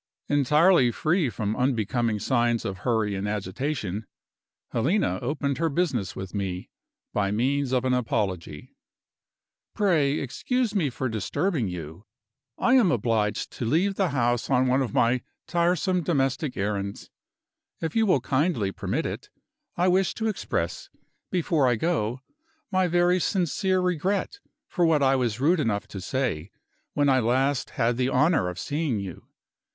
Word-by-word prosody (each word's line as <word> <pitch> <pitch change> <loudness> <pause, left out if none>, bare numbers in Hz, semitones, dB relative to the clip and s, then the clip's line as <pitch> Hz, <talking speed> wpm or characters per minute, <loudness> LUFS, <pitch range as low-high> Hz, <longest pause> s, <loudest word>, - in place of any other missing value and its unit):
Entirely 145 +1 +4
free 155 +4 +1
from 110 -2 -2
unbecoming 120 -3 0
signs 120 +1 +1
of 95 -1 -4
hurry 110 -1 0
and 95 +1 -3
agitation, 105 0 -3 0.6
Helena 125 - +1
opened 140 +1 -2
her 165 0 +1
business 140 - -1
with 95 -1 -7
me 95 -3 -4 0.4
by 100 -1 +1
means 130 +6 0
of 130 -1 +1
an 130 - +2
apology. 95 -11 -2 1.0
"Pray 160 -9 +2
excuse 245 - -1
me 175 -9 +1
for 130 +1 -3
disturbing 120 - -1
you. 85 +2 -7 0.5
I 250 - +2
am 235 -9 +5
obliged 110 -4 0
to 120 - -5
leave 170 - +2
the 195 -2 0
house 120 -3 0
on 130 -1 +3
one 130 +1 +2
of 125 -5 -2
my 120 +3 +2 0.3
tiresome 180 +1 +1
domestic 140 -3 0
errands. 100 0 -3 0.7
If 160 -1 -4
you 225 -1 +3
will 145 -9 +3
kindly 130 - 0
permit - - -2
it, - - -5 0.5
I 180 +1 +2
wish 185 +1 +2
to 225 - -3
express, 160 - -3 0.4
before 165 -6 +1
I 120 - +3
go, 130 -4 -1 0.5
my 185 -1 +2
very 175 +1 +3
sincere 185 +1 +1
regret 185 - -1 0.3
for 180 - -1
what 160 -4 +3
I 135 0 +4
was 120 -4 -1
rude 165 +6 +3
enough 105 -8 -1
to 95 - -7
say, 105 - -2 0.5
when 145 -1 +3
I 130 -1 +4
last 130 +3 +1
had 120 -1 +1
the 130 0 +1
honor 135 - +2
of 90 - -7
seeing 145 - -1
you. 95 -3 -8
130 Hz, 150 wpm, -26 LUFS, 110-170 Hz, 1.0 s, am